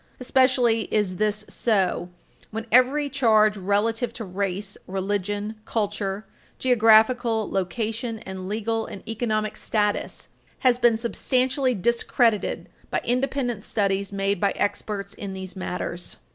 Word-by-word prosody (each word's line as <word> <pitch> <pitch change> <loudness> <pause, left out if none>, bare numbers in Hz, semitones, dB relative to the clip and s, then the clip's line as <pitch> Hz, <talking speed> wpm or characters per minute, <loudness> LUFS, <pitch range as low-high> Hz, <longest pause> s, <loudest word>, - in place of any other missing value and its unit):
Especially 250 -3 +2
is 200 -4 +1
this 210 +1 0
so 190 -6 0 0.4
when 225 +1 -5
every 260 +5 +4
charge 220 -6 +3
relative 210 +5 0
to 225 - -6
race, 195 +1 -3
religion, 205 +3 -3
culture, 205 -2 -2 0.3
geographical 225 -1 +4
location, 220 +5 -2
and 190 -2 -7
legal 225 +1 -1
and 200 - -10
economic 215 -1 -1
status 210 -2 -1 0.3
has 250 -2 +4
been 235 -2 +4
substantially 255 +2 +1
discredited 235 +1 +1 0.2
by - - -1
independent 245 -3 -1
studies 200 -2 0
made 195 -1 -1
by 200 - +2
experts 200 -1 -2
in 195 -2 -6
these 190 0 -7
matters. 180 -1 -4
215 Hz, 115 wpm, -24 LUFS, 200-235 Hz, 0.4 s, every